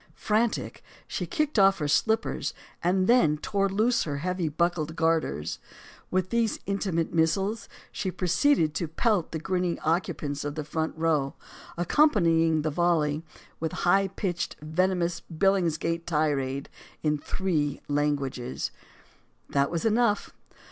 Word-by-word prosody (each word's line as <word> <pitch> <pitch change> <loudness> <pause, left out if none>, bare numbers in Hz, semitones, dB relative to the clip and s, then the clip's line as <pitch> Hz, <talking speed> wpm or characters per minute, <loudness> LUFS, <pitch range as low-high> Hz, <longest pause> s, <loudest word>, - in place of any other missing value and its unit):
Frantic, 220 +1 0 0.3
she - - -3
kicked 305 -8 0
off 195 0 +6
her 150 - -2
slippers, 220 +9 +1 0.3
and 185 +2 +2
then 175 -10 +4
tore 195 +5 0
loose 220 +5 +2
her 145 -3 -3
heavy 180 +1 -1
buckled 160 0 -1
garters. 160 - 0 0.5
With 185 0 0
these 235 -2 +1
intimate 190 -4 -1
missiles 195 +7 +1 0.2
she 190 - -3
proceeded 180 - +2
to 165 +2 -2
pelt 190 +2 0
the 160 - -2
grinning 180 +1 -1
occupants 155 -3 -1
of 145 0 -4
the 155 - -3
front 160 +2 -3
row, 155 -4 +1 0.4
accompanying 165 - +3
the 155 - 0
volley 155 -2 +1 0.4
with 160 -1 -2
a - - -4
high 195 +2 +4
pitched, 185 -2 -3
venomous 175 +2 0
Billingsgate 170 -2 +1
tirade 140 -4 0 0.4
in 150 -1 +1
three 150 -5 -1
languages. 140 -4 -1 0.8
That 140 0 +2
was 170 +2 -2
enough. 225 -1 +2
170 Hz, 130 wpm, -27 LUFS, 155-195 Hz, 0.8 s, off